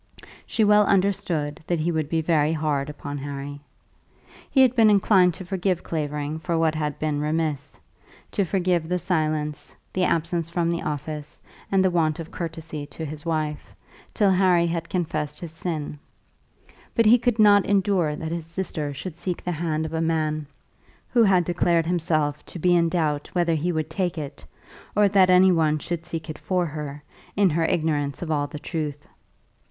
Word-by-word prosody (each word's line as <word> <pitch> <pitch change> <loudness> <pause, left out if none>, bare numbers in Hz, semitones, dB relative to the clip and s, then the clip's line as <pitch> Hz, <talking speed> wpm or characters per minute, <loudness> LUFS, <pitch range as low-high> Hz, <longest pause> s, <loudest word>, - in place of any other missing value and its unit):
She 220 - +1
well 210 0 +5
understood 180 -6 0
that 175 -2 0
he 165 +3 0
would 155 -3 -1
be 160 -1 0
very 155 -1 +2
hard 150 -3 -1
upon 145 -1 -6
Harry. 140 0 -6 0.9
He 270 - +4
had 255 -1 +5
been 225 -3 +6
inclined 190 -4 +4
to 185 - -8
forgive 185 -1 -1
Clavering 150 -1 -3
for 170 0 -1
what 160 -1 +2
had 150 -2 -2
been 150 -2 -1
remiss, 150 -2 -2 0.5
to 200 - +1
forgive 180 -3 0
the 180 - +1
silence, 155 -4 -2 0.2
the 185 - +1
absence 170 -1 0
from 170 0 0
the 170 - -2
office, 150 0 -5 0.3
and 190 -1 +3
the 185 - +3
want 160 -3 +1
of 165 0 -7
courtesy 160 -3 -6
to 160 +2 -7
his 150 +2 -8
wife, 155 -2 -3 0.4
till 205 -3 +3
Harry 180 -2 +4
had 170 0 -3
confessed 155 -4 -2
his 170 -3 -7
sin; 160 -3 -4 1.0
but 230 - +3
he 235 +3 +7
could 240 -1 +1
not 205 -2 +6
endure 190 -6 +2
that 160 +1 -5
his 165 -1 -4
sister 160 -4 -3
should 175 +3 -6
seek 175 0 -4
the 180 - -2
hand 160 -1 -1
of 160 - -6
a 160 - 0
man 155 -2 0 0.6
who 240 - +4
had 190 -5 +5
declared 170 -1 +2
himself 155 -4 0
to - - -8
be 175 +1 +3
in 170 -1 +3
doubt 155 -4 -1
whether 175 -2 +2
he 160 +3 0
would 155 -1 -2
take 180 -1 -1
it, 145 -3 -6 0.5
or 210 0 +5
that 195 -2 +4
any 185 +1 +6
one 155 -3 +2
should 165 +2 -4
seek 160 -1 -5
it 155 -1 -7
for 180 -2 0
her, 150 -2 -6 0.3
in 195 -3 +4
her 165 +2 +1
ignorance 150 -3 0
of 160 - -4
all 145 -1 0
the 150 - -8
truth. 150 -2 -4
165 Hz, 180 wpm, -24 LUFS, 150-180 Hz, 1.0 s, he